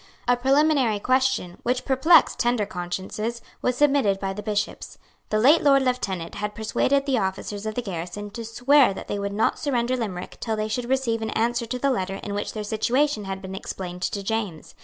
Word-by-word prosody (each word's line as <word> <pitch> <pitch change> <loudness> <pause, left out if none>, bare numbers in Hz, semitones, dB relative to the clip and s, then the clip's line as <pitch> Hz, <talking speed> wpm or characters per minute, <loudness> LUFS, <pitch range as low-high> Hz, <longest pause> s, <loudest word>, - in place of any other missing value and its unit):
A 245 - +5
preliminary 270 -2 +3
question, 255 -6 +1
which 250 +1 -1
perplexed 275 +6 +5
tender 240 -3 +2
consciences, 195 +5 -4 0.2
was 250 0 0
submitted 275 -9 +3
by 195 -1 -2
the 210 - -6
Bishops. 210 0 -3 0.3
The 215 - +1
late 280 +9 +6
Lord 275 -2 +5
Lieutenant 195 -10 -2
had 210 0 -4
persuaded 275 +5 +1
the 265 -4 +1
officers 200 +2 -3
of 215 - -4
the 245 - -2
garrison 195 +2 -5
to 230 - -6
swear 245 0 +4
that - - -8
they 205 - -3
would 200 0 -2
not 210 +2 +1
surrender 255 -3 0
Limerick 205 -7 -5
till 225 -2 -2
they 215 0 -2
should 240 +2 -3
receive 255 -4 0
an 220 - -2
answer 235 +1 0
to 250 - -3
the 275 +2 +1
letter 195 -6 -2
in 200 +1 -6
which 205 - -3
their 215 - -4
situation 225 +3 0
had 195 0 -5
been 190 0 -6
explained 180 -2 -6
to 200 +2 -2
James. 205 -6 -3
220 Hz, 200 wpm, -24 LUFS, 200-255 Hz, 0.3 s, late